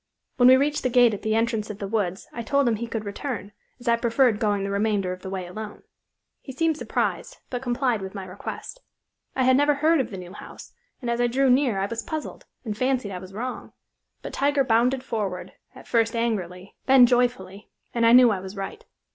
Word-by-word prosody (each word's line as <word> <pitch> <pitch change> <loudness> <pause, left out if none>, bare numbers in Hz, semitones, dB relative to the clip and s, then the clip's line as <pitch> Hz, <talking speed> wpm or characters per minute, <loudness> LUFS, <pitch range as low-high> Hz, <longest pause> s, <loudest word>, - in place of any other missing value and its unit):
When 245 -1 +6
we 260 0 +8
reached 290 +2 0
the 255 - 0
gate 245 -2 +5
at 205 - -5
the 220 0 0
entrance 225 -1 0
of 210 - -6
the 200 - -5
woods 195 -2 -2
I 235 - -4
told 280 +4 +1
him 225 -2 +1
he 235 +2 -4
could 225 -2 -4
return, 205 -1 -5 0.3
as 245 - -13
I 235 0 +4
preferred 230 -1 +2
going 205 -2 0
the 200 - -3
remainder 200 -2 0
of 185 - -10
the 190 - -7
way 190 -1 -4
alone. 210 +4 -8 0.6
He 265 - -9
seemed 325 +3 +1
surprised, - - -2
but 245 -1 -3
complied 245 -3 0
with 190 +1 -7
my 195 -1 -5
request. 195 - -8 0.5
I 260 - +1
had 260 0 +5
never 290 +2 +3
heard 315 +1 +3
of 245 - -5
the 195 - -7
new 180 0 -9
house, - - -11 0.3
and 240 - -3
as 235 +1 0
I 240 - +3
drew 260 +2 +2
near 250 -5 +2
I 195 - 0
was 230 +3 -4
puzzled, 310 -1 -6 0.2
and 215 -2 -3
fancied 255 -3 0
I 180 - -5
was 185 +1 -11
wrong; 250 +4 -5 0.5
but - - -7
Tiger 280 0 +2
bounded 250 +2 +2
forward, 205 -8 -4 0.2
at - - -13
first 230 0 +1
angrily, 195 -5 -3
then 265 -2 +8
joyfully, 240 -6 0 0.2
and 235 - 0
I 230 - +6
knew 245 -1 +8
I 195 - -1
was 190 +2 -8
right. 195 - -6
230 Hz, 225 wpm, -25 LUFS, 200-255 Hz, 0.6 s, we